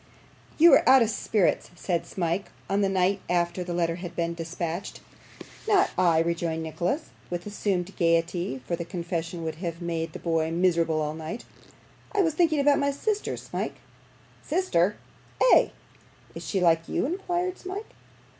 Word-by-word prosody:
'You 330 Hz, -1 st, +8 dB
are -, -, +6 dB
out 265 Hz, -2 st, +8 dB
of 225 Hz, -, 0 dB
spirits,' 210 Hz, -3 st, +1 dB
said 175 Hz, -1 st, -2 dB
Smike, 175 Hz, +1 st, -2 dB, 0.2 s
on 200 Hz, +1 st, +1 dB
the 195 Hz, -, +2 dB
night 190 Hz, +1 st, +1 dB
after 175 Hz, +1 st, 0 dB
the 175 Hz, -, -6 dB
letter 170 Hz, -1 st, 0 dB
had 175 Hz, -1 st, -7 dB
been 170 Hz, 0 st, -1 dB
dispatched. 170 Hz, +2 st, -4 dB, 0.7 s
'Not 400 Hz, -3 st, +4 dB
I!' 170 Hz, -3 st, +4 dB
rejoined 165 Hz, 0 st, 0 dB
Nicholas, 175 Hz, -, -2 dB, 0.2 s
with 175 Hz, 0 st, -4 dB
assumed 195 Hz, -2 st, -2 dB
gaiety, 165 Hz, -4 st, +1 dB
for 170 Hz, -, -1 dB
the 170 Hz, -, -4 dB
confession 170 Hz, -1 st, -4 dB
would 160 Hz, -1 st, -4 dB
have 170 Hz, -1 st, -4 dB
made 165 Hz, -2 st, -3 dB
the -, -, -5 dB
boy 165 Hz, -2 st, 0 dB
miserable 165 Hz, -2 st, +2 dB
all 150 Hz, 0 st, -2 dB
night; 160 Hz, +8 st, -6 dB, 0.7 s
'I 405 Hz, -, +4 dB
was 325 Hz, -3 st, +1 dB
thinking 315 Hz, -2 st, +2 dB
about 280 Hz, 0 st, +4 dB
my 280 Hz, -1 st, +2 dB
sister, 410 Hz, +9 st, -2 dB
Smike.' -, -, -4 dB, 0.7 s
'Sister!' 210 Hz, -, +1 dB, 0.4 s
'Ay.' -, -, +6 dB, 0.6 s
'Is -, -, -8 dB
she 195 Hz, -, 0 dB
like 165 Hz, -2 st, +3 dB
you?' -, -, 0 dB
inquired 360 Hz, +2 st, -2 dB
Smike. 385 Hz, +4 st, -6 dB
175 Hz, 160 wpm, -27 LUFS, 165-225 Hz, 0.7 s, You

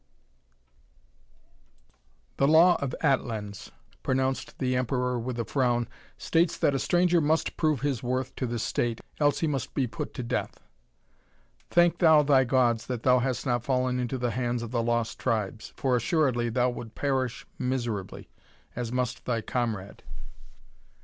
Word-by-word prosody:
"The 140 Hz, -, +3 dB
law 165 Hz, +4 st, +6 dB
of 140 Hz, -2 st, -2 dB
Atlans," 110 Hz, -8 st, -1 dB, 0.3 s
pronounced 130 Hz, 0 st, -1 dB
the 130 Hz, -1 st, 0 dB
Emperor 125 Hz, 0 st, 0 dB
with 120 Hz, +1 st, -4 dB
a 115 Hz, -, -1 dB
frown, 120 Hz, -3 st, +1 dB, 0.3 s
"states 165 Hz, 0 st, +1 dB
that 140 Hz, -, +2 dB
a 135 Hz, -, 0 dB
stranger 175 Hz, +1 st, +3 dB
must 155 Hz, +2 st, +1 dB
prove 155 Hz, -6 st, +1 dB
his 140 Hz, -5 st, -1 dB
worth 130 Hz, +1 st, -2 dB
to 130 Hz, -, -1 dB
the 120 Hz, 0 st, -3 dB
State, 115 Hz, +1 st, -1 dB, 0.2 s
else 145 Hz, -1 st, +2 dB
he 165 Hz, -, +2 dB
must 140 Hz, -4 st, -3 dB
be 135 Hz, -, +2 dB
put 115 Hz, -, -6 dB
to 125 Hz, -, -4 dB
death. 120 Hz, +1 st, -3 dB, 1.1 s
Thank 175 Hz, 0 st, +3 dB
thou 160 Hz, -3 st, +6 dB
thy 135 Hz, -2 st, +4 dB
gods 120 Hz, -3 st, +2 dB
that 125 Hz, -3 st, -4 dB
thou 125 Hz, -1 st, +5 dB
hast 125 Hz, 0 st, -2 dB
not 120 Hz, -3 st, 0 dB
fallen 125 Hz, -1 st, 0 dB
into 125 Hz, +1 st, -2 dB
the 120 Hz, -1 st, -1 dB
hands 120 Hz, +1 st, -1 dB
of 115 Hz, -, -6 dB
the 120 Hz, -2 st, 0 dB
Lost 115 Hz, -1 st, -1 dB
Tribes, 110 Hz, -1 st, -2 dB
for 130 Hz, -2 st, +1 dB
assuredly 125 Hz, -2 st, +1 dB
thou 125 Hz, +2 st, +1 dB
would 115 Hz, -2 st, -8 dB
perish 130 Hz, -4 st, -1 dB
miserably, 120 Hz, -6 st, -3 dB, 0.5 s
as 120 Hz, -1 st, -3 dB
must 125 Hz, -1 st, -2 dB
thy 115 Hz, -2 st, 0 dB
comrade." 110 Hz, -4 st, -3 dB
125 Hz, 155 wpm, -27 LUFS, 120-135 Hz, 1.1 s, law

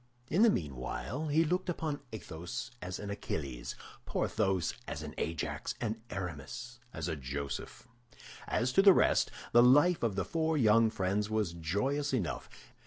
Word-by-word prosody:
In 175 Hz, +7 st, +3 dB
the 230 Hz, -, +8 dB
meanwhile, 80 Hz, -, -3 dB
he 155 Hz, +3 st, +3 dB
looked 180 Hz, +3 st, 0 dB
upon 155 Hz, -4 st, -2 dB
Athos 90 Hz, -5 st, -6 dB
as 90 Hz, +1 st, -4 dB
an 100 Hz, -1 st, -5 dB
Achilles, 70 Hz, -10 st, -4 dB, 0.3 s
Porthos 95 Hz, -5 st, 0 dB
as -, -, -4 dB
an -, -, -7 dB
Ajax, 80 Hz, -1 st, -2 dB
and 110 Hz, -1 st, -2 dB
Aramis 95 Hz, -, -6 dB
as -, -, -4 dB
a 80 Hz, -, -1 dB
Joseph. 70 Hz, -, -5 dB, 0.6 s
As 125 Hz, +3 st, 0 dB
to -, -, +6 dB
the 195 Hz, -1 st, +9 dB
rest, -, -, +3 dB, 0.2 s
the 120 Hz, -, +7 dB
life 145 Hz, +8 st, +6 dB
of 115 Hz, -5 st, 0 dB
the 95 Hz, -3 st, 0 dB
four 160 Hz, -, 0 dB
young 115 Hz, -2 st, +5 dB
friends 100 Hz, +1 st, 0 dB
was 110 Hz, -5 st, 0 dB
joyous 130 Hz, -, -1 dB
enough. 85 Hz, -, -2 dB
110 Hz, 155 wpm, -32 LUFS, 85-145 Hz, 0.6 s, the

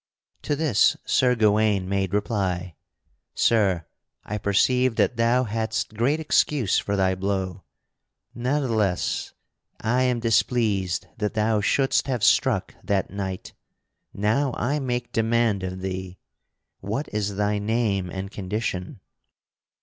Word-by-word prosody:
To 145 Hz, -, -1 dB
this 145 Hz, -8 st, +3 dB
Sir 125 Hz, -1 st, +3 dB
Gawaine 105 Hz, -3 st, +2 dB
made 95 Hz, -1 st, -1 dB
reply: 95 Hz, -4 st, -1 dB, 0.6 s
"Sir, 95 Hz, -8 st, +2 dB, 0.4 s
I 105 Hz, +1 st, -4 dB
perceive 125 Hz, +5 st, +2 dB
that 125 Hz, -, +2 dB
thou 115 Hz, +2 st, +3 dB
hadst 110 Hz, -1 st, -2 dB
great 125 Hz, +8 st, +1 dB
excuse 150 Hz, -, +2 dB
for 100 Hz, -, -2 dB
thy 95 Hz, -1 st, +2 dB
blow. 95 Hz, 0 st, -3 dB, 0.7 s
Ne'theless, 120 Hz, -7 st, -1 dB, 0.5 s
I 120 Hz, +3 st, +1 dB
am 125 Hz, -2 st, +1 dB
displeased 110 Hz, -5 st, +1 dB
that 105 Hz, 0 st, -2 dB
thou 110 Hz, 0 st, +2 dB
shouldst 135 Hz, +5 st, +2 dB
have 125 Hz, -5 st, -2 dB
struck -, -, +3 dB
that 100 Hz, -3 st, -1 dB
knight. 95 Hz, -2 st, -5 dB, 0.6 s
Now 115 Hz, +7 st, 0 dB
I 140 Hz, +5 st, 0 dB
make 125 Hz, -3 st, -3 dB
demand 115 Hz, -2 st, +1 dB
of 95 Hz, 0 st, -5 dB
thee 95 Hz, -1 st, -5 dB, 0.6 s
what 110 Hz, +10 st, -3 dB
is 105 Hz, -1 st, -1 dB
thy 105 Hz, +1 st, 0 dB
name 105 Hz, -3 st, 0 dB
and 95 Hz, +2 st, -6 dB
condition?" 100 Hz, +1 st, -4 dB
105 Hz, 120 wpm, -24 LUFS, 95-120 Hz, 0.7 s, this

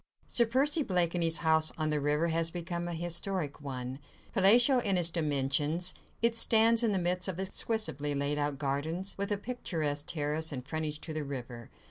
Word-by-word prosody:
Sir 235 Hz, -2 st, +2 dB
Percy 280 Hz, +6 st, +2 dB
Blakeney's 170 Hz, -, +1 dB
house 160 Hz, 0 st, +3 dB
on 155 Hz, -1 st, -1 dB
the 150 Hz, -, 0 dB
river 150 Hz, +3 st, +1 dB
has 165 Hz, 0 st, 0 dB
become 175 Hz, 0 st, -5 dB
a 175 Hz, -, -4 dB
historic 170 Hz, -2 st, -2 dB
one: 130 Hz, -1 st, -6 dB, 0.3 s
palatial 235 Hz, +6 st, +6 dB
in 200 Hz, -6 st, +1 dB
its 170 Hz, -1 st, +3 dB
dimensions, 150 Hz, +2 st, 0 dB, 0.3 s
it 235 Hz, 0 st, +3 dB
stands 230 Hz, 0 st, +4 dB
in 230 Hz, -3 st, +1 dB
the 195 Hz, -, +1 dB
midst 180 Hz, +1 st, 0 dB
of 185 Hz, -2 st, -4 dB
exquisitely 190 Hz, -, -1 dB
laid 140 Hz, +1 st, -1 dB
out 145 Hz, -1 st, -1 dB
gardens, 155 Hz, +7 st, -2 dB
with 200 Hz, +1 st, -2 dB
a 205 Hz, -, +1 dB
picturesque 160 Hz, -11 st, -3 dB
terrace 155 Hz, +1 st, -1 dB
and 130 Hz, -2 st, -6 dB
frontage 155 Hz, 0 st, -3 dB
to 160 Hz, -, -5 dB
the 155 Hz, -1 st, -3 dB
river. 125 Hz, -4 st, -7 dB
165 Hz, 175 wpm, -30 LUFS, 145-190 Hz, 0.3 s, palatial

